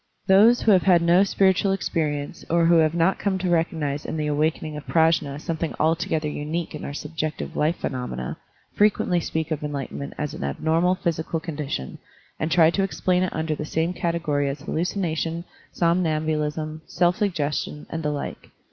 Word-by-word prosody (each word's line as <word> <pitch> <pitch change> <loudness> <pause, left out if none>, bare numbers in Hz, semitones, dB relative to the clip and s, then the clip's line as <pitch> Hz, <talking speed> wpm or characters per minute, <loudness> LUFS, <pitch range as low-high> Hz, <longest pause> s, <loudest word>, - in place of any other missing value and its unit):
Those 215 +5 +6
who 220 - +4
have 185 -2 +6
had 175 -2 +4
no 175 +3 +5
spiritual 195 0 +2
experience 150 -5 -2
or 170 0 +3
who 170 0 +5
have 160 0 +3
not 170 +3 +2
come 200 -2 0
to 185 -1 -1
recognize 160 -4 0
in - - -4
the 155 - -1
awakening 155 +1 0
of 150 - -8
Prajfia 160 -3 +2
something 165 +1 -3
altogether 160 -1 +1
unique 155 +3 -3
in 150 - -7
our - - -4
sub 150 +3 -7
jective 155 -1 -3
life 155 +3 +1
phenomena 125 - -4 0.4
frequently 205 -4 +2
speak 160 -1 -3
of 155 -1 -2
enlightenment 140 -1 -5
as 150 -1 -3
an - - -6
abnormal 160 - +1
psychical 165 -1 -1
con 160 -1 -6
dition, 135 - -4 0.4
and 155 - -1
try 165 -1 +6
to 195 - 0
explain 185 -2 +1
it 185 - -1
under 160 0 -1
the 150 - -4
same 160 +3 -1
category 165 -5 0
as 140 +1 -5
hallucination, 165 0 -2 0.3
somnambulism, 155 -2 0
self 175 0 +2
suggestion, 150 -7 -2
and 165 - -3
the 150 - -1
like. 145 -1 -5
160 Hz, 175 wpm, -24 LUFS, 150-175 Hz, 0.4 s, Those